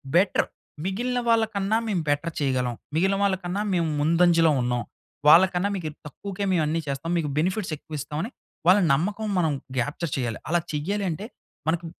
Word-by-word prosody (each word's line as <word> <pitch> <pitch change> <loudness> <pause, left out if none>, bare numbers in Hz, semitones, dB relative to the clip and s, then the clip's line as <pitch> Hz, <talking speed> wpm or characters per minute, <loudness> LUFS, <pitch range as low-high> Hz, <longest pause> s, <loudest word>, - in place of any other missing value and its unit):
Better 185 +3 +3 0.4
మిగిలిన 245 +6 -1
వాళ్ళకన్నా 220 -2 +2
మేము 190 -5 0
బెటర్ 155 +3 0
చేయగలం. 130 -4 0 0.2
మిగిలిన 190 +4 +2
వాళ్ళకన్నా 190 0 0
మేము 170 -2 +1
ముందంజలో 165 +1 +4
ఉన్నాం. 120 0 0 0.4
వాళ్ళ 165 +4 +9
కన్నా 185 +3 +1
మీకేక్ 155 -5 -5
తక్కువకే 200 +7 -5
మేమన్నీ 160 -1 +1
చేస్తాం. 140 +4 -3
మీకు 155 -3 -1
బెనిఫిట్స్ 185 +1 0
ఎక్కువ 155 +1 -8
ఇస్తామని 150 - -4 0.4
వాళ్ళ 185 +3 +7
నమ్మకం 205 +9 -1
మనం 160 -3 +2 0.3
గ్యాప్చర్ 145 +5 -2
చేయాలి. 120 -4 -2
అలా 175 +1 +3
చేయాలి 195 +7 -1
అంటే 175 +6 -4 0.4
మనకి 170 +1 0
170 Hz, 150 wpm, -25 LUFS, 150-195 Hz, 0.4 s, వాళ్ళ